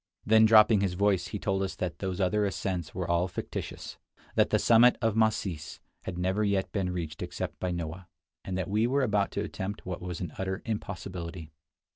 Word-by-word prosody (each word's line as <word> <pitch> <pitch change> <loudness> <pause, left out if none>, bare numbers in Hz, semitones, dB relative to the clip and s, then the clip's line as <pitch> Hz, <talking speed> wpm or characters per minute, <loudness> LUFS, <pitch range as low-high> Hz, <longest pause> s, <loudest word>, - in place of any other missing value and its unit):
Then 110 +1 +6
dropping 110 -1 +7
his 95 -3 0
voice, 95 -2 +2
he 105 - -4
told 95 -1 -1
us 95 -1 -2
that 85 -3 -4
those 95 -1 -3
other 105 +3 +2
ascents 95 -4 -2
were 90 -2 -2
all 85 +1 +2
fictitious; 90 - -6 0.4
that - - +3
the - - +3
summit 120 +1 +6
of 115 -2 +1
"Masis" 100 -8 0 0.3
had 90 - -4
never 95 +4 0
yet 100 -2 0
been 95 -3 -1
reached 80 -4 -5
except - - -4
by 90 - -1
Noah; 85 +1 -4 0.4
and 95 -1 -3
that 95 -3 -2
we 110 +4 +2
were 140 +2 +2
about 105 -4 +2
to 100 - -1
attempt 100 0 -5
what 90 -1 -5
was 90 -2 -5
an 90 - -5
utter 95 0 -3
impossibility. 90 -6 -5
95 Hz, 195 wpm, -29 LUFS, 90-105 Hz, 0.4 s, dropping